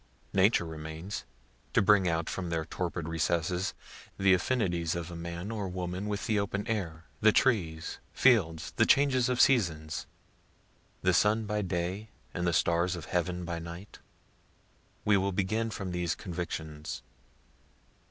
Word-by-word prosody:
Nature 95 -1 +4
remains; 80 +4 -6 0.5
to - - +5
bring 95 -2 +5
out 80 -1 0
from 90 -2 -3
their 80 -1 -1
torpid 85 -1 -3
recesses, 85 +3 0 0.4
the 95 -1 +5
affinities 90 -5 +1
of 85 0 -4
a - - -6
man 85 +4 -5
or 105 -3 -3
woman 90 +2 -3
with 105 0 -2
the 110 -2 +2
open 100 +1 -2
air, 90 -8 -3
the 110 0 +6
trees, 85 -11 +1
fields, 85 -11 +3
the - - +5
changes 130 -3 +4
of 125 -1 0
seasons 80 - +2 1.0
the 95 0 +4
sun 105 +4 +3
by 105 0 -1
day 95 +3 -2 0.2
and 90 0 -1
the - - +3
stars 85 +2 +2
of 85 -3 -7
heaven 90 0 -1
by 85 0 -3
night. 85 +4 -9 1.1
We 105 -1 +5
will 100 +1 +1
begin 105 +4 0
from 95 -4 -4
these 90 -2 -1
convictions. 80 -4 -5
90 Hz, 145 wpm, -30 LUFS, 85-105 Hz, 1.1 s, the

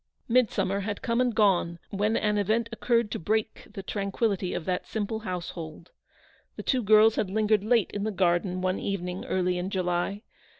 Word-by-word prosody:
Midsummer 225 -5 +2
had 205 +1 -4
come 235 +1 +1
and 245 -3 +1
gone, 185 -5 +2
when 210 +3 +1
an 210 -1 +1
event 220 +3 +1
occurred 230 -1 +1
to - - -3
break 215 +5 -2
the 200 -2 -7
tranquillity 200 -1 -1
of 160 - -4
that 180 -1 -2
simple 220 0 -3
household. 175 -5 -6 0.6
The - - -7
two 260 -2 +1
girls 215 +1 +5
had 195 - 0
lingered 215 0 +2
late 225 -2 +2
in 205 - -3
the 220 - 0
garden 180 -1 +1
one 185 0 0
evening 180 -2 -3
early 180 -1 0
in 180 +2 -3
July. 185 +2 -1
200 Hz, 175 wpm, -27 LUFS, 185-220 Hz, 0.6 s, girls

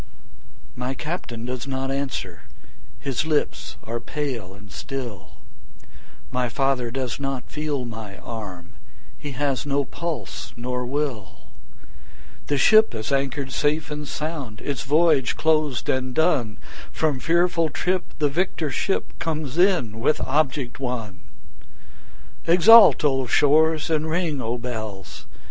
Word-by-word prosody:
My 125 +2 -3
Captain 125 -9 -5
does 125 +1 -4
not 135 0 -2
answer, 130 - -4 0.5
his 135 -1 -1
lips 155 -1 -1
are 115 +1 -4
pale 120 -6 -4
and 100 0 -15
still, 120 - -6 1.0
My 125 -1 0
father 135 -2 0
does 130 0 -3
not 135 -2 -4
feel 150 -4 -2
my 110 -4 -8
arm, 95 -6 -8 0.5
he 145 -2 -6
has 140 -1 0
no 140 -1 0
pulse 170 +3 -5
nor 125 +1 -3
will; 125 - -4 1.0
The 145 - +1
ship 215 - +6
is 110 +4 -4
anchor'd 135 0 -1
safe 150 +3 0
and 150 0 -5
sound, 145 -9 -4
its 140 -4 -3
voyage 150 -2 +3
closed 155 -6 +1
and 130 -1 -1
done, 125 -10 +2 0.3
From 150 -5 0
fearful 170 +1 +2
trip 180 +3 -1
the 150 - +2
victor 160 0 -1
ship 195 - -1
comes 155 -2 -2
in 175 - +3
with 140 +6 +2
object 135 -3 0
won; 115 -8 -4 1.3
20 170 - +5
Exult, 210 -2 +8
O 135 -3 +2
shores! 155 +4 +3
and 155 0 +1
ring, 160 -4 0
O 115 +1 -2
bells! 110 -5 -6
135 Hz, 130 wpm, -24 LUFS, 120-155 Hz, 1.3 s, Exult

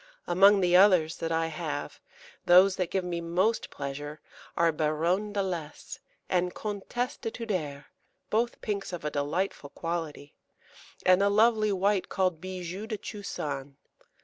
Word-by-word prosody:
Among 195 +3 +5
the 180 -1 +3
others 180 -4 +5
that 165 - -3
I 165 0 +1
have, 160 - -5 0.5
those 185 +2 +7
that 180 -2 -1
give 190 - -1
me 175 -1 -3
most 185 +7 0
pleasure 145 +2 -6 0.4
are 170 -1 +4
Baronne 165 +7 0
d'Alès 185 -7 -4 0.3
and 180 -1 0
Comtesse 215 +4 -3
de - - -4
Tuder, 175 - -4 0.5
both 235 +2 0
pinks 200 -3 -3
of 170 -4 -5
a 150 - -1
delightful 145 +2 -2
quality, 160 -3 -5 0.7
and 185 +1 +5
a 200 - +4
lovely 215 0 +3
white 195 0 +1
called 185 -4 0
Bijou 185 +2 -6
de 220 -2 -3
Chusan. 145 - -6
180 Hz, 140 wpm, -28 LUFS, 160-200 Hz, 0.7 s, those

